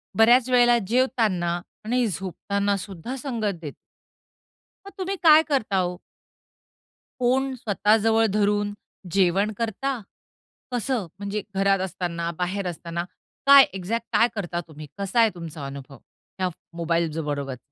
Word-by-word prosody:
बऱ्याचं 240 Hz, +3 st, +5 dB
वेळेला 240 Hz, -1 st, +5 dB
जेवताना 215 Hz, -8 st, +1 dB, 0.3 s
आणि 245 Hz, +2 st, +1 dB
झोपताना 200 Hz, +2 st, -2 dB
सुद्धा 195 Hz, +5 st, -6 dB
संगत 225 Hz, -, -3 dB
देतो. 150 Hz, -4 st, -7 dB, 1.1 s
मग 395 Hz, -, -9 dB
तुम्ही 385 Hz, +1 st, -2 dB
काय 310 Hz, 0 st, +9 dB
करता 205 Hz, -8 st, +1 dB
ओ? 180 Hz, 0 st, -4 dB, 1.2 s
फोन 260 Hz, +2 st, +2 dB
स्वतः 215 Hz, -2 st, +2 dB
जवळ 225 Hz, +1 st, +3 dB
धरून 205 Hz, 0 st, +1 dB, 0.4 s
जेवण 195 Hz, +3 st, +2 dB
करता? 240 Hz, +4 st, -2 dB, 0.7 s
कसं? 245 Hz, -4 st, -1 dB
म्हणजे 205 Hz, +1 st, -3 dB
घरात 195 Hz, 0 st, +3 dB
असताना, 170 Hz, -2 st, -3 dB
बाहेर 185 Hz, +2 st, -2 dB
असताना, 170 Hz, 0 st, -4 dB, 0.4 s
काय 280 Hz, 0 st, +10 dB
एक्झॅक्ट 210 Hz, +5 st, -3 dB
काय 230 Hz, -, +5 dB
करता 175 Hz, -4 st, -3 dB
तुम्ही? 155 Hz, -1 st, -10 dB
कसा 200 Hz, +4 st, 0 dB
आहे 225 Hz, -1 st, +6 dB
तुमचा 160 Hz, -4 st, -7 dB
अनुभव 135 Hz, -1 st, -9 dB, 0.4 s
या 185 Hz, -1 st, +1 dB, 0.3 s
मोबाईलज 165 Hz, -1 st, 0 dB
बरोबर? 140 Hz, -4 st, -3 dB
200 Hz, 125 wpm, -24 LUFS, 175-235 Hz, 1.2 s, काय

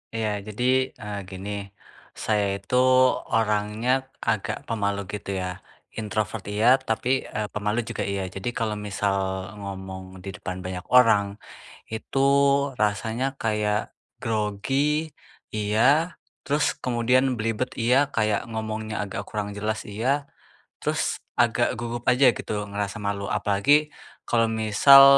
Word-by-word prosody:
Iya 110 Hz, -1 st, 0 dB, 0.2 s
jadi, 105 Hz, +4 st, -4 dB, 0.4 s
eee, 105 Hz, 0 st, -4 dB
gini, 95 Hz, +2 st, -7 dB, 0.6 s
saya 105 Hz, -2 st, 0 dB, 0.2 s
itu 100 Hz, -, -3 dB, 0.6 s
orangnya 105 Hz, +1 st, +1 dB, 0.3 s
agak 110 Hz, 0 st, 0 dB
pemalu 100 Hz, -3 st, 0 dB
gitu 105 Hz, -1 st, -5 dB
ya, 90 Hz, -, -2 dB, 0.5 s
introvert 110 Hz, 0 st, -2 dB
iya, 110 Hz, +3 st, +2 dB, 0.2 s
tapi, 110 Hz, +2 st, 0 dB, 0.2 s
eee, 105 Hz, -1 st, -3 dB
pemalu 105 Hz, +2 st, 0 dB
juga -, -, -3 dB
iya. 100 Hz, -, -1 dB
Jadi 95 Hz, +5 st, -2 dB
kalo 110 Hz, -2 st, 0 dB
misal 100 Hz, 0 st, 0 dB, 0.4 s
ngomong 95 Hz, -1 st, -7 dB
di 100 Hz, -, -5 dB
depan 90 Hz, 0 st, -5 dB
banyak 90 Hz, -1 st, -5 dB
orang 115 Hz, -5 st, +6 dB, 0.7 s
itu 110 Hz, +4 st, -5 dB, 0.6 s
rasanya 110 Hz, +4 st, 0 dB, 0.2 s
kayak 105 Hz, -1 st, 0 dB, 0.3 s
grogi 135 Hz, +9 st, 0 dB, 0.4 s
iya, 105 Hz, +1 st, 0 dB, 0.6 s
terus 145 Hz, +2 st, +1 dB, 0.2 s
kemudian 125 Hz, +1 st, +3 dB
belibet 115 Hz, +3 st, -1 dB
iya, 125 Hz, +3 st, +4 dB, 0.2 s
kayak 105 Hz, -2 st, +2 dB
ngomongnya 110 Hz, -1 st, -4 dB
agak 95 Hz, -, -4 dB
kurang 105 Hz, -1 st, -3 dB
jelas 110 Hz, +1 st, -1 dB
iya. 130 Hz, +8 st, 0 dB, 0.6 s
Terus -, -, 0 dB, 0.4 s
agak -, -, +3 dB
gugup 120 Hz, 0 st, -4 dB
aja 130 Hz, +2 st, +5 dB
gitu, -, -, -5 dB, 0.2 s
ngerasa 100 Hz, +1 st, -3 dB
malu. 100 Hz, -1 st, -2 dB
Apalagi 100 Hz, +7 st, +2 dB, 0.6 s
kalau 115 Hz, -1 st, +3 dB
misal 135 Hz, +6 st, +8 dB
105 Hz, 120 wpm, -25 LUFS, 100-115 Hz, 0.7 s, misal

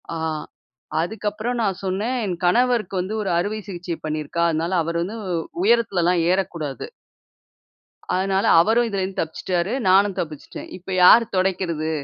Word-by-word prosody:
ஆ -, -, -3 dB, 0.8 s
அதுக்கப்புறம் 215 Hz, +5 st, -3 dB
நான் 195 Hz, -4 st, -1 dB
சொன்னேன், 205 Hz, +7 st, -1 dB
என் 180 Hz, -3 st, -3 dB
கணவருக்கு 230 Hz, -1 st, +2 dB
வந்து 195 Hz, +4 st, -4 dB
ஒரு 195 Hz, -, -2 dB
அறுவை 210 Hz, +4 st, -2 dB
சிகிச்சை 175 Hz, -3 st, -5 dB
பண்ணியிருக்கா. 155 Hz, +2 st, -2 dB
அதனால 165 Hz, +3 st, -1 dB
அவரு 170 Hz, +1 st, -2 dB
வந்து 215 Hz, +5 st, -5 dB, 0.5 s
உயரத்துலலாம் 185 Hz, -6 st, +3 dB
ஏற 185 Hz, -, +3 dB, 0.2 s
கூடாது. 145 Hz, -6 st, -5 dB, 1.3 s
அதனால 190 Hz, +1 st, +1 dB, 0.2 s
அவரும் 225 Hz, +6 st, +3 dB
இதுல 200 Hz, -3 st, -2 dB
இருந்து 190 Hz, 0 st, -5 dB
தப்பிச்சுட்டாரு. 175 Hz, +4 st, -2 dB, 0.2 s
நானும் 195 Hz, 0 st, +4 dB
தப்பிச்சுட்டேன். 155 Hz, -3 st, -7 dB
இப்ப 185 Hz, +1 st, -8 dB
யாரு 230 Hz, +6 st, +8 dB
தொடைக்கிறது. 175 Hz, -4 st, 0 dB
190 Hz, 135 wpm, -22 LUFS, 170-210 Hz, 1.3 s, யாரு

